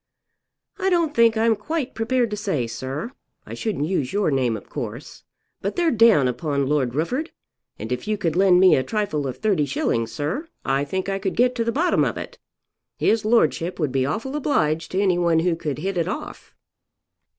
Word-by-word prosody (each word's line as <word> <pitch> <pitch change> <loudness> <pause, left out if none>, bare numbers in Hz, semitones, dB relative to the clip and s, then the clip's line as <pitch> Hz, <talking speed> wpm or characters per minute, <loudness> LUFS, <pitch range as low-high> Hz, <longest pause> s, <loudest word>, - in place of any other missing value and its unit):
"I 385 0 +1
don't 340 -4 +1
think 230 -4 +4
I'm 225 0 +3
quite 275 +6 -3
prepared 230 0 0
to - - -1
say, 195 - -1
sir. 135 - -5 0.3
I - - -9
shouldn't 205 - -2
use 155 -7 -1
your 205 -5 +1
name 125 -5 +1
of 100 - -13
course. - - -7 0.4
But 200 - -3
they're 340 -2 +2
down 220 - +5
upon 140 +3 -1
Lord 135 -3 0
Rufford, 255 - -1 0.5
and 110 +3 -7
if 125 +7 -3
you 215 -1 0
could 170 -6 -1
lend 185 -1 +5
me 185 0 +7
a - - +2
trifle 155 -4 -2
of 130 - -6
30_s._, 145 - 0
sir, 170 - -3 0.2
I 135 +1 +1
think 190 +6 -3
I 195 0 -1
could 190 -1 -2
get 250 +1 +3
to 235 -2 -1
the 230 - 0
bottom 335 +8 +2
of - - -1
it. - - -8 0.6
His 220 -1 +1
lordship 185 -6 +2
would 150 -5 0
be 135 0 +1
awful 225 - -3
obliged 165 - 0
to 190 - +1
any 185 -3 +2
one 170 -2 +3
who 175 0 +1
could 150 -4 -4
hit 195 0 -3
it 165 - 0
off." 235 +11 -7
190 Hz, 195 wpm, -23 LUFS, 145-230 Hz, 0.6 s, me